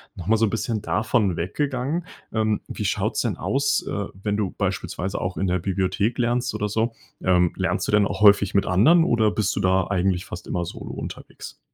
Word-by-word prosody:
Noch 85 - -8
mal 110 +1 +4
so 115 - +3
'n 105 - 0
bisschen 115 -1 -2
davon 105 -3 +1
weggegangen, 140 - -2 0.3
ähm, 110 -1 +1
wie - - -5
schaut's - - 0
denn - - -1
aus, 140 +1 0
äh, 100 -1 -2 0.2
wenn 105 0 -1
du 100 -3 -1
beispielsweise 95 +2 -2
auch 90 0 -3
in 95 - 0
der 90 0 +1
Bibliothek 95 +4 -1
lernst 120 +1 0
oder 105 - -1
so, 115 +3 0 0.3
ähm, 90 -1 +3
lernst - - -1
du - - -1
denn 105 -1 +4
auch - - -5
häufig 100 -2 +6
mit 100 - +3
Anderen 145 - +5
oder 110 -8 +2
bist 105 -1 0
du - - -1
da 95 -1 +2
eigentlich 95 -2 0
fast - - -8
immer 85 -1 -2
solo - - -7
unterwegs? - - -8
105 Hz, 205 wpm, -23 LUFS, 95-115 Hz, 0.3 s, häufig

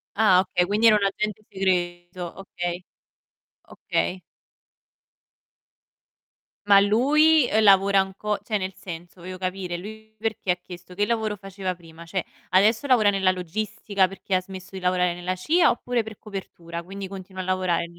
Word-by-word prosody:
Ah, 200 -4 +5
okay, 180 -1 0
quindi 210 +4 +3
era 215 - +7
un 200 - -1
agente 215 +2 -2
segreto, 175 -2 -2
okay. 175 -2 -5 0.8
Okay. 185 +1 -2 2.5
Ma 200 -1 +7
lui, 285 +7 +4
ehm, 220 0 +3
lavora 195 0 +6
anco 200 +2 -3
cioè 215 - -1
nel 190 -1 -4
senso, 175 0 -9
voglio 185 +1 -7
capire: 185 -1 -3
lui 220 +4 -10
perché 220 -4 -1
ha - - +2
chiesto? 180 0 -11
Che 205 +2 +1
lavoro 220 -2 -1
faceva 195 -1 -4
prima? 165 -1 -14
Cioè 180 +2 -3 0.2
adesso 215 +8 +3
lavora 235 -6 +5
nella 195 -2 +3
logistica 200 +2 -1
perché 195 0 -3
ha 185 - +2
smesso 190 +1 -10
di 190 - -6
lavorare 180 -1 +2
nella 180 +1 -3
CIA 325 - +3
oppure 240 -1 -1
per 220 -1 -10
copertura, 170 -5 -7
quindi 195 +2 -7
continua 190 -1 -8
a - - -6
lavorare 185 -2 0
190 Hz, 155 wpm, -24 LUFS, 180-210 Hz, 2.5 s, era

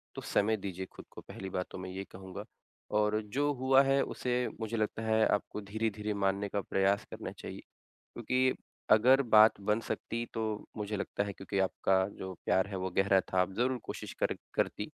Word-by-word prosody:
तो - - -5
समय 110 +2 +1
दीजिए 95 -2 -5
खुद - - -12
को - - -10
पहली 95 - -8
बात 90 -1 -2
तो - - -7
मैं 95 0 -6
ये 95 +1 -5
कहूँगा। 95 0 -8 0.5
और 105 0 +2
जो 135 +8 0
हुआ 130 0 +5
है 135 0 +3
उसे 125 -1 -1
मुझे 110 +1 -2
लगता 110 +1 -1
है 110 0 +3
आपको 105 +1 -1
धीरे-धीरे 105 +1 -2
मानने 100 0 0
का 100 +1 -1
प्रयास 100 +1 +1
करना - - -6
चाहिए। - - -8 0.4
क्योंकि 130 +2 0 0.4
अगर 130 +6 +6
बात 110 -4 +6
बन 105 +3 +1
सकती 115 0 -3
तो 115 - -1 0.3
मुझे 105 0 -3
लगता 100 0 -2
है 100 - -4
क्योंकि 95 0 -4
आपका 95 0 +2
जो 95 0 -5
प्यार 95 - +3
है 100 - -4
वो 95 0 -2
गहरा 95 0 +5
था 95 - +3
आप 90 +1 +1
ज़रूर 125 +2 +1
कोशिश - - -6
कर - - +2 0.2
करती। - - 0
105 Hz, 190 wpm, -32 LUFS, 95-115 Hz, 0.5 s, अगर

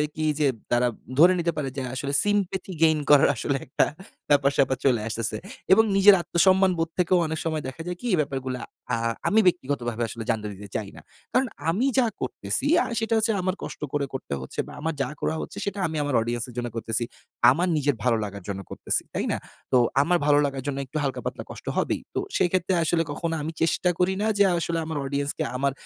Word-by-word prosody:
কি 155 - -1
যে 150 - +4 0.2
তারা 120 +1 +3 0.3
ধরে 175 +3 +8
নিতে 170 0 +1
পারে 140 -2 -1
যে - - -1
আসলে 140 +1 -3
sympathy 195 -2 0
gain 160 -1 +5
করার 145 -1 +7
আসলে 135 +4 -1
একটা 130 - +2 0.4
ব্যাপার-স্যাপার 140 -2 +3
চলে 125 -5 +3
আসতেছে। 115 0 -2 0.4
এবং 220 +3 +6
নিজের 195 +1 +8
আত্মসম্মানবোধ 185 -1 +3
থেকেও 180 +1 +3
অনেক 160 0 -3
সময় 155 -2 -1
দেখা 130 +5 -7
যায় 180 0 -3
কি? 245 - -4
এ - - +4
ব্যাপারগুলো 135 -3 -3 0.4
আ - - +4 0.3
আমি 220 - +4
ব্যক্তিগতভাবে 130 -9 0
আসলে 115 - -6
জানতে 110 -2 0
দিতে 100 +1 -10
চাই 105 -3 -2
না। - - -11 0.3
কারন 255 +1 +3 0.2
আমি 200 +10 +1
যা 255 - +5 0.2
করতেছি - - -1 0.2
আ - - -3
সেটা 225 0 -1
হচ্ছে 220 +1 +2
আমার 185 +1 -1
কষ্ট - - -7
করে 145 -1 +1
করতে 130 - -5
হচ্ছে 65 - -8
বা, - - -10
আমার 160 +1 -1
যা 130 - -1
করা 160 - 0
হচ্ছে, - - -8
সেটা 200 0 -3
আমি 160 -1 -4
আমার 145 -3 -1
audience 120 +1 -2
এর - - -11
জন্য 120 0 -1
করতেছি, 115 0 -1 0.5
আমার 170 +7 +1
নিজের 145 -2 +1
ভালো 120 -2 +3
লাগার 100 -2 -6
জন্য 100 -1 -3
করতেছি, - - 0
তাই - - -1
না? - - 0 0.3
তো 130 - +5 0.2
আমার 175 +5 +3
ভালো 145 -1 +5
লাগার 135 -2 -3
জন্য 140 -1 -2
একটু 135 - -6
হালকা 135 -2 -2
পাতলা - - -4
কষ্ট - - -11
হবেই। - - +4 0.3
তো - - +1 0.2
সেক্ষেত্রে 185 +1 +1
আসলে 165 +1 +2
কখনো 165 +2 -2
আমি 155 +2 -3
চেষ্টা 165 +2 +2
করি 180 +1 +3
না 215 - +1
যে 205 - +6
আসলে 170 0 -1
আমার 160 -1 -4
audience 140 +1 -1
কে - - 0
আমার 140 +1 +1
150 Hz, 210 wpm, -25 LUFS, 130-180 Hz, 0.5 s, ধরে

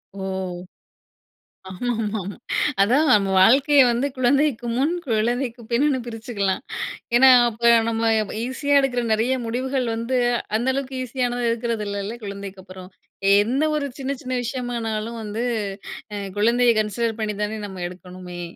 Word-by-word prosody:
ஓ! - - -8 1.5
ஆமா, 190 +6 -6
ஆமா, 215 0 -2
ஆமாம். 195 +3 -6 0.5
அதான் 260 +10 +3
நம்ம 200 -3 +3
வாழ்க்கையை 275 +7 +6
வந்து 240 +4 0
குழந்தைக்கு 260 -1 +2
முன் 280 +6 +1
குழந்தைக்கு 240 +1 -1
பின்னுன்னு 265 +3 +2
பிரிச்சுக்கலாம். 225 -4 -2 0.5
ஏன்னா 260 +2 +7 0.2
அப்ப 235 +1 +3 0.2
நம்ம 225 0 0 0.4
ஈஸியா 285 +3 +1
எடுக்குற 250 -3 0
நெறைய 230 +4 +1
முடிவுகள் 255 +3 -1
வந்து 230 +3 -1 0.4
அந்த 240 +3 -2
அளவுக்கு 265 -1 -4
ஈஸியானது 245 -1 -2
இருக்கறது 230 -2 -2
இல்லல்ல 200 +3 -4
குழந்தைக்கு 200 -1 -7
அப்புறம். 185 -1 -11 0.5
எந்த 255 +7 0
ஒரு 295 -2 -1
சின்ன 270 0 -2
சின்ன 255 - -4
விஷயமானாலும் 235 -2 -3
வந்து 215 +2 -3 1.0
குழந்தையை 235 +2 +4
கன்சிடர் 225 +1 -2
பண்ணி 210 -1 -2
தானே 215 +1 -3
நம்ம 190 -2 -8
எடுக்கணுமே. 180 0 -9
235 Hz, 130 wpm, -22 LUFS, 210-255 Hz, 1.5 s, ஏன்னா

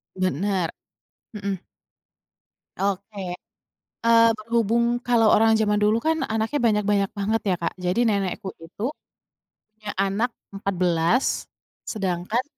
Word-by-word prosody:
Bener. 185 0 0 0.6
Mhm. 200 -3 -3 1.2
Oke, 195 -1 -2 0.7
eee, 230 0 +6
berhubung 235 +2 +1
kalau 230 -3 +4
orang 225 0 +5
zaman 210 -1 +2
dulu 210 +2 +3
kan 320 +4 0
anaknya 220 +6 -1
banyak-banyak 205 -2 +2
banget 215 +3 +1
ya, - - +3
Kak. 170 - -2
Jadi 180 +3 -1
nenekku 195 -2 -1
itu 165 +7 -6 0.9
punya 215 -1 -7
anak 200 +5 +1 0.2
14 185 +3 +1 0.6
sedangkan 195 +3 -2
205 Hz, 105 wpm, -24 LUFS, 190-225 Hz, 1.2 s, eee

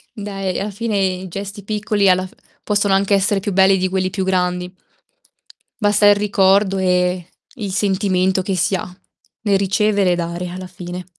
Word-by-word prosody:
Dai 195 -3 -4
alla 200 - -3
fine 215 +1 -2
i 190 -1 -1
gesti 200 +3 -7
piccoli 210 -1 +1
alla 185 0 +3
f - - -21 0.3
possono 205 -1 +1
anche 195 +1 +2
essere 200 +1 +1
più 205 +1 -3
belli 190 0 +4
di 185 0 0
quelli 185 0 -1
più 190 +1 -2
grandi. 180 -1 -1 1.1
Basta 205 0 +3
il 205 - +7
ricordo 195 -1 +2
e 180 -1 +1 0.3
il 210 -6 -5
sentimento 190 -1 +1
che 190 0 -2
si 190 - +1
ha 180 0 -5 0.5
nel 200 -3 +3
ricevere 200 0 +1
e - - +2
dare 170 +1 -4
alla 185 +1 -7
fine. 180 0 -8
190 Hz, 170 wpm, -19 LUFS, 185-205 Hz, 1.1 s, il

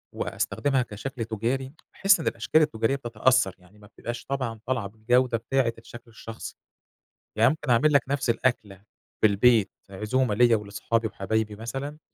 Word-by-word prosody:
وأستخدمها 135 -2 -1
كشكل 120 +2 -5
تجاري، 120 +5 -2 0.2
باحس 195 -2 +4
إن 160 - -4
الأشكال 115 +8 +2
التجارية 135 -4 +1
بتتأثر، 120 -4 +1
يعني 90 +3 -21
ما 105 - -16
بتبقاش 120 +3 -7
طبعًا 130 -5 -3
طالعة 120 -5 -1
بالجودة 115 +4 +1
بتاعة 120 +1 0
الشكل 115 +1 -13
الشخصي. 115 0 -9 0.8
يعني 110 +1 +5
ممكن 150 -2 -4
أعمل 140 +6 +4
لَك 140 -3 +5
نفس 135 -3 0
الأكلة 110 -5 -1 0.4
في - - +6
البيت، 110 +1 +4 0.2
عزومة 105 +4 0
ليَّ 120 +1 +5
ولأصحابي 110 +2 -1
وحبايبي 110 0 -2
مثلًا، 135 +7 -6
115 Hz, 150 wpm, -26 LUFS, 110-130 Hz, 0.8 s, في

